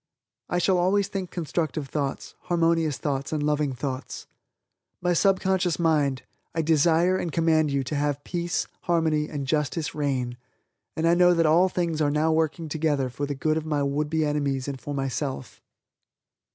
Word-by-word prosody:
I 175 Hz, -, 0 dB
shall 180 Hz, +1 st, +2 dB
always 195 Hz, +2 st, +2 dB
think 195 Hz, -3 st, -4 dB
constructive 155 Hz, -3 st, -2 dB
thoughts, 140 Hz, -1 st, -3 dB
harmonious 165 Hz, -4 st, +1 dB
thoughts 140 Hz, -1 st, -3 dB
and 155 Hz, -2 st, -1 dB
loving 150 Hz, -2 st, 0 dB
thoughts. 130 Hz, 0 st, -5 dB, 0.7 s
"My 180 Hz, 0 st, +1 dB
Subconscious 190 Hz, -1 st, +2 dB
Mind, 150 Hz, -6 st, +1 dB, 0.3 s
I 165 Hz, -, +1 dB
desire 165 Hz, +3 st, +3 dB
and 170 Hz, -, -3 dB
command 160 Hz, -2 st, +2 dB
you 140 Hz, -1 st, 0 dB
to 130 Hz, -, -5 dB
have 145 Hz, 0 st, -1 dB
peace, 175 Hz, -1 st, -2 dB, 0.2 s
harmony 160 Hz, -3 st, +1 dB
and 145 Hz, -3 st, -4 dB
justice 150 Hz, +1 st, -1 dB
reign, 130 Hz, -5 st, -2 dB, 0.6 s
and 160 Hz, -, -1 dB
know 180 Hz, 0 st, +6 dB
that 165 Hz, -1 st, +3 dB
all 170 Hz, +4 st, +5 dB
things 170 Hz, -3 st, -1 dB
are 145 Hz, -, +3 dB
now 155 Hz, +2 st, +2 dB
working 160 Hz, +1 st, 0 dB
together 150 Hz, -4 st, 0 dB
for 145 Hz, +3 st, -3 dB
the 145 Hz, -, -3 dB
good 155 Hz, +3 st, 0 dB
of 160 Hz, -, -3 dB
my 150 Hz, -2 st, 0 dB
would 145 Hz, +2 st, -1 dB
be 160 Hz, 0 st, +1 dB
enemies 145 Hz, -3 st, -1 dB
and 140 Hz, -2 st, -5 dB
for 145 Hz, -, -5 dB
myself." 135 Hz, -1 st, -4 dB
155 Hz, 165 wpm, -25 LUFS, 140-170 Hz, 0.7 s, know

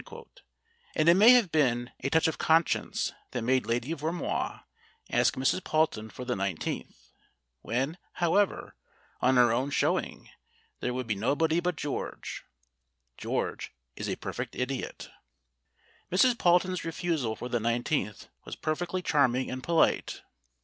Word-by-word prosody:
And 155 Hz, -, +2 dB
it 170 Hz, -, +9 dB
may 205 Hz, +6 st, +7 dB
have 235 Hz, -9 st, +4 dB
been 120 Hz, -5 st, +1 dB
a 135 Hz, -, -2 dB
touch 160 Hz, +3 st, +3 dB
of 160 Hz, -, -3 dB
conscience 160 Hz, +1 st, +1 dB, 0.2 s
that 120 Hz, -, -2 dB
made 125 Hz, -2 st, +1 dB
Lady 120 Hz, +6 st, -1 dB
Vermoise 165 Hz, +3 st, -3 dB, 0.5 s
ask -, -, +3 dB
Mrs. 130 Hz, +7 st, +1 dB
Palton 155 Hz, -11 st, 0 dB
for 125 Hz, -, -8 dB
the 125 Hz, -, -1 dB
iQth, 95 Hz, -5 st, -4 dB, 0.5 s
when, 135 Hz, +9 st, -2 dB
however, 185 Hz, +4 st, +1 dB, 0.5 s
on 130 Hz, +1 st, +4 dB
her 120 Hz, -2 st, +5 dB
own 130 Hz, +4 st, 0 dB
show -, -, +2 dB
ing -, -, -9 dB, 0.5 s
there 125 Hz, -, -2 dB
would 125 Hz, 0 st, -3 dB
be 110 Hz, -, 0 dB
nobody 150 Hz, +11 st, +1 dB
but 175 Hz, 0 st, -1 dB
George 145 Hz, -1 st, -5 dB, 0.7 s
(George -, -, -3 dB, 0.2 s
is -, -, -4 dB
a -, -, -1 dB
perfect -, -, -6 dB
idiot). 125 Hz, +1 st, -4 dB, 1.0 s
Mrs. 245 Hz, +8 st, +5 dB
Palton's 180 Hz, -2 st, +2 dB
refusal 165 Hz, -8 st, -2 dB
for 125 Hz, -, -6 dB
the 120 Hz, -1 st, -1 dB
iQth 115 Hz, -1 st, -1 dB, 0.2 s
was -, -, -7 dB
perfectly 175 Hz, +4 st, -2 dB
charming 130 Hz, -5 st, +2 dB
and 130 Hz, 0 st, -4 dB
polite. 165 Hz, +3 st, +1 dB
140 Hz, 140 wpm, -29 LUFS, 125-170 Hz, 1.0 s, it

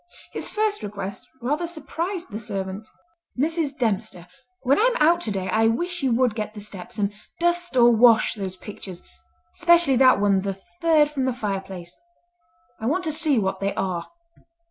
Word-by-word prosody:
His -, -, -4 dB
first 425 Hz, -1 st, 0 dB
request 200 Hz, -1 st, -6 dB, 0.2 s
rather 295 Hz, +7 st, 0 dB
surprised 340 Hz, -, -4 dB
the 210 Hz, -, -4 dB
servant. 195 Hz, -1 st, -4 dB, 0.5 s
"Mrs. 305 Hz, 0 st, -1 dB
Dempster, 195 Hz, -7 st, -1 dB, 0.4 s
when 270 Hz, +2 st, +3 dB
I 445 Hz, -, +4 dB
am -, -, +1 dB
out 340 Hz, +3 st, +4 dB
to 220 Hz, -, -2 dB
day 190 Hz, -2 st, -2 dB
I 225 Hz, +2 st, +3 dB
wish 345 Hz, +10 st, 0 dB
you 265 Hz, -2 st, +1 dB
would 245 Hz, -1 st, +2 dB
get 215 Hz, -1 st, -5 dB
the -, -, -7 dB
steps 210 Hz, +3 st, -7 dB
and 205 Hz, -1 st, 0 dB, 0.3 s
dust 345 Hz, -3 st, 0 dB
or 240 Hz, 0 st, +7 dB
wash 230 Hz, -1 st, +5 dB
those 195 Hz, -4 st, -5 dB
pictures—specially 270 Hz, -, -1 dB
that 255 Hz, -4 st, +6 dB
one 200 Hz, -2 st, +3 dB
the 195 Hz, 0 st, -3 dB, 0.3 s
third 310 Hz, -3 st, +4 dB
from 270 Hz, -3 st, -1 dB
the 260 Hz, -, 0 dB
fireplace—I 290 Hz, -, -8 dB
want 360 Hz, +8 st, 0 dB
to 320 Hz, -, -1 dB
see 310 Hz, -3 st, +2 dB
what 190 Hz, -3 st, 0 dB
they 200 Hz, 0 st, -2 dB
are." 180 Hz, -3 st, -2 dB
245 Hz, 165 wpm, -24 LUFS, 200-330 Hz, 0.5 s, or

